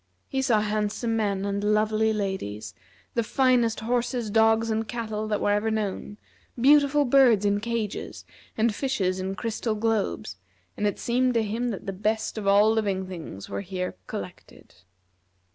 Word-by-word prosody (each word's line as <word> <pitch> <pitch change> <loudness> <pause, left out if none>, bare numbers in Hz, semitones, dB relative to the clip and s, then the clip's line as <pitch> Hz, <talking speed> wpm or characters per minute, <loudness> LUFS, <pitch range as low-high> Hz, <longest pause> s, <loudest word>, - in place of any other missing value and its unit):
He 265 - -1
saw 235 -5 +3
handsome 215 +2 -1
men 200 -3 0
and 200 0 -2
lovely 215 +1 +2
ladies; 190 - -3 0.4
the 235 - +1
finest 240 -2 +2
horses, 240 -1 -1
dogs, 225 +1 +3
and 220 0 -1
cattle 220 -3 -4
that 210 -1 0
were 205 - +1
ever 210 +2 +1
known; 210 -1 -3 0.4
beautiful 290 +2 +5
birds 245 -6 +5
in 205 0 +2
cages, 225 -1 -4 0.3
and 225 0 +2
fishes 205 -8 -1
in 190 +1 -3
crystal 220 +2 -2
globes, 210 - -1 0.4
and 210 - 0
it 205 - -2
seemed 250 +1 +1
to 230 - +3
him 230 +4 -2
that 205 - -5
the 195 - -3
best 215 +3 -1
of 200 - -4
all 205 +2 +5
living 200 -4 0
things 165 - -8
were - - -4
here 185 -1 -4
collected. 95 -2 -9
215 Hz, 160 wpm, -26 LUFS, 200-230 Hz, 0.4 s, beautiful